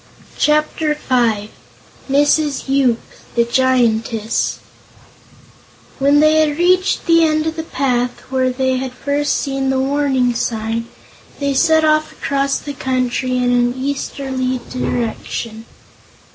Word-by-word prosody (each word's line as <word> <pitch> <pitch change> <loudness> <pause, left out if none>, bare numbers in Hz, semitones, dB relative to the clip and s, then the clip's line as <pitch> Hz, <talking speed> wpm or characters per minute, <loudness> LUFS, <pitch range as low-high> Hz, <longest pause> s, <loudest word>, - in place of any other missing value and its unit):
Chapter 305 0 +1
Five 230 -7 0 0.6
Mrs. 290 +1 +2
Yoop, 265 -4 +2 0.4
the 235 - +4
Giantess 235 -3 +1 1.4
When 285 +2 +4
they 310 0 +4
had 300 -2 +1
reached 365 +2 +2
the 330 -1 +5
end 310 -1 +1
of 320 0 -2
the 325 - -3
path, 250 -5 -1
where 260 -1 +1
they 260 0 0
had 260 -1 -4
first 285 +3 -1
seen 270 -1 -2
the 265 - +1
warning 265 -2 +1
sign, 230 0 -2 0.5
they 280 -1 0
set 315 +3 +3
off 310 0 +2
across 275 0 -1
the 290 - -7
country 255 -1 -1
in 250 0 +1
an 245 0 +2
easterly 265 -1 -3
direction. 230 -2 -3
265 Hz, 120 wpm, -18 LUFS, 245-290 Hz, 1.4 s, the